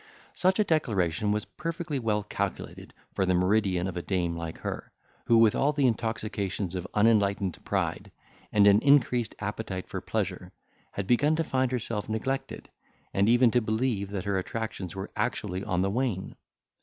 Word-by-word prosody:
Such 185 +1 +2
a 215 - +4
declaration 105 - +1
was 105 0 -1
perfectly 165 -3 -4
well 105 -3 0
calculated 100 -2 -4 0.2
for - - 0
the 95 -1 +2
meridian 95 -1 +2
of 95 -1 -4
a 90 - -2
dame 85 -2 -1
like 85 -1 -5
her, - - -5 0.3
who 115 - +5
with 115 -2 +6
all 145 +2 +2
the 140 -2 +2
intoxications 105 -5 -1
of 90 0 -4
unenlightened 100 -4 +2
pride, - - -2 0.4
and 105 -1 +5
an 100 +1 +6
increased 125 -4 +3
appetite 100 -2 -4
for - - -5
pleasure, - - -3 0.4
had 100 - -3
begun 145 +9 +3
to 165 - +1
find 130 -4 0
herself 115 -4 -3
neglected, 130 +5 -3 0.5
and 100 +2 +3
even 120 0 +5
to 125 - +3
believe 110 -2 -1
that 100 -2 -4
her 100 -1 +1
attractions 100 -3 -5
were 95 +1 -6
actually 105 -5 -2
on 90 -1 0
the 95 - 0
wane. 115 -5 -2
105 Hz, 170 wpm, -28 LUFS, 95-120 Hz, 0.5 s, with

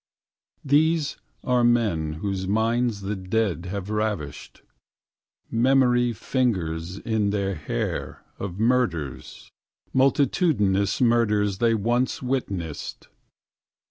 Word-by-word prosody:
These 150 +2 +2 0.3
are 125 -1 +2
men 105 -11 +2
whose 95 +3 -3
minds 115 +1 +1
the 100 +2 -3
Dead 95 -2 -1
have 100 +2 -4
ravished. 105 -10 -3 0.9
Memory 125 0 +3
fingers 95 -8 -1
in 110 -1 0
their 100 -1 -1
hair 75 -4 -4 0.2
of 95 -1 -5
murders, 110 - -1 0.4
Multitudinous 130 - +2
murders 105 -5 +2
they 115 -1 +3
once 120 +4 0
witnessed. 100 - -4
105 Hz, 90 wpm, -24 LUFS, 95-125 Hz, 0.9 s, Memory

